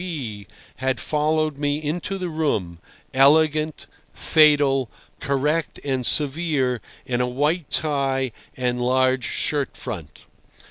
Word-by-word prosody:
K. - - -5
B. 120 - -5 0.3
had 130 -2 -1
followed 155 +1 0
me 145 0 0
into 165 +6 -3
the 185 -1 -3
room, 110 - -1 0.3
elegant, 155 +3 +3 0.3
fatal, 145 -5 +3 0.3
correct 150 +4 -1
and 130 -2 -1
severe 145 -4 +1 0.2
in 125 -1 -1
a 125 - +1
white 150 +6 0
tie 135 -4 0 0.3
and 125 -1 -1
large 130 0 +2
shirt 145 -2 -1
front. 100 - -7
140 Hz, 120 wpm, -23 LUFS, 130-155 Hz, 0.3 s, elegant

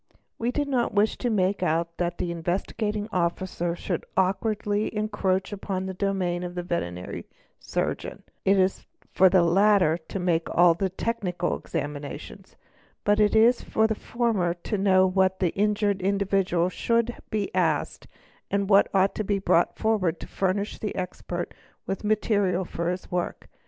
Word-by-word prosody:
We 235 - 0
do 290 +2 0
not 250 -5 0
wish 210 +2 +3
to 245 - 0
make 195 -3 +1
out 170 -1 0
that 175 -1 -2
an 175 - -1
Investigating 205 +5 -2
Officer 175 -1 -1
_ - - -8
should - - -3
awkwardly 205 +2 0
encroach 205 -2 -1
upon 190 -2 -3
the 190 - -4
domain 185 -2 -1
of 180 0 -5
the 175 - -3
veterinary 90 - -4 0.3
surgeon; - - -3 0.2
it 195 +1 +4
is 190 0 +1 0.3
for 190 0 +6
the 180 -1 +4
latter 180 -2 +4
to 160 +4 -7
make 170 -2 +1
all 175 0 +7
technical 185 0 -2
examinations, 145 -1 -6 0.5
but 205 +1 +3
it 210 0 +3
is 235 +3 +5
for 220 - +1
the 220 - +2
former 215 -7 -1
to 180 +5 -4
know 190 -2 +4
what 190 0 +2
the 180 -3 +1
injured 205 -1 +1
individual 195 -2 +1
should 235 +4 0
be 210 -2 -2
asked - - 0 0.4
and 200 0 0
what 200 +1 +6
ought 195 +1 +3
to 215 - -2
be 205 0 0
brought 175 -3 +2
forward 195 -7 +1
to - - -6
furnish 195 +2 -1
the 210 - -4
expert 175 -1 -4 0.3
with 195 - -4
material 205 -3 +1
for 170 0 -3
his 180 +1 -5
work. 180 0 -3
190 Hz, 160 wpm, -26 LUFS, 175-210 Hz, 0.5 s, all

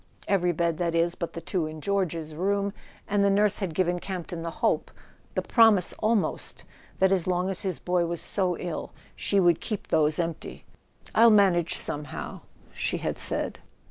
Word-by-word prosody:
Every 180 -3 +2
bed, 170 0 -1
that 170 -1 0
is, 170 +1 +2
but 170 - -5
the 170 - -6
two 170 -1 -1
in 155 0 -7
George's 165 -4 -1
room; 200 +4 0 0.3
and 205 -1 +2
the 200 - +4
nurse 205 +1 +2
had 185 -6 -3
given 175 0 +1
Campton 175 -2 -5
the 165 - -3
hope, - - 0 0.5
the - - 0
promise 220 -6 +4
al¬ 220 +1 +3
most, 200 - -2 0.3
that 190 0 +3
as 185 -3 +2
long 180 +1 +1
as 185 - -4
his 190 -2 -2
boy 180 -1 0
was 170 0 -3
so 185 -4 0
ill 175 -3 -5 0.2
she 200 - +1
would 175 -3 +4
keep 215 -3 -4
those 150 0 +3
empty. 165 -2 -4 0.5
"I'll 230 +1 +7
manage 190 -6 +4
somehow," 150 0 -5 0.3
she - - -1
had - - -3
said. - - -2
180 Hz, 180 wpm, -27 LUFS, 170-200 Hz, 0.5 s, I'll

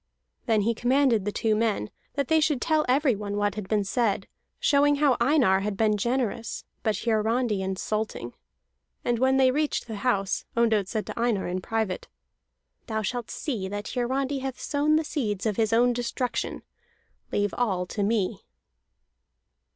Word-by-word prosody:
Then 220 -2 +3
he 230 +3 +1
commanded 245 -3 +2
the 210 - 0
two 220 0 +1
men 215 - 0 0.2
that 280 -2 0
they 320 0 +4
should 300 -3 +2
tell 310 +1 +1
everyone 230 -7 +1
what 205 -1 +1
had 205 -2 -6
been 210 0 +1
said, 200 -1 0 0.3
showing 290 0 +4
how 285 -3 +3
Einar 240 -8 +4
had 200 0 -3
been 215 0 +3
generous, 235 +1 -2 0.2
but 220 -2 +1
Hiarandi 225 -1 +1
insulting. 200 +3 -3 0.7
And 240 -1 +1
when 265 +1 +3
they 260 -1 +5
reached 300 +2 0
the 220 -3 -6
house, 200 -3 0
Ondott 220 -4 +3
said 215 +1 -2
to - - -6
Einar 230 -5 +1
in 180 +1 -2
private: 220 -3 -2 0.8
"Thou 220 -2 -2
shalt 240 +2 -3
see 225 -10 -3
that 205 +2 -5
Hiarandi 265 +3 -1
hath 265 -1 -5
sown 295 +1 +1
the 315 - +2
seeds 220 - -2
of 215 -3 0
his 220 -1 +2
own 240 +2 +4
destruction. 245 +1 -2 0.7
Leave 205 0 0
all 195 -7 0
to 205 - -4
me." 205 -2 0
225 Hz, 160 wpm, -26 LUFS, 205-260 Hz, 0.8 s, they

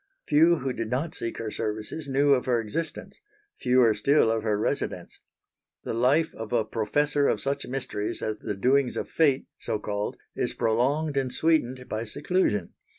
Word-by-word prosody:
Few 160 +3 +5
who 135 -4 -3
did 115 -2 -4
not 150 +7 -2
seek 115 -9 -4
her 110 -2 -4
services 110 +10 -4
knew 140 +1 +4
of 125 -2 +1
her 125 -3 +2
existence, 155 - -5 0.4
fewer 125 -3 +4
still 115 +2 +3
of 115 0 0
her 105 -2 0
residence. 105 - -3 0.6
The - - -3
life 135 +8 +2
of 110 -1 -7
a 115 -3 +2
professor 140 +7 +1
of - - +1
such 140 +1 -2
mysteries 125 -5 -3
as 110 -1 -2
the 105 - -4
doings 130 +5 +2
of - - -3
Fate 140 -4 +2
so - - -2
called 105 0 -3 0.2
is - - -1
prolonged 140 +7 +1
and 130 -2 0
sweetened 130 -6 +1
by 110 +2 -3
seclusion. 145 - 0
125 Hz, 170 wpm, -26 LUFS, 110-145 Hz, 0.6 s, Few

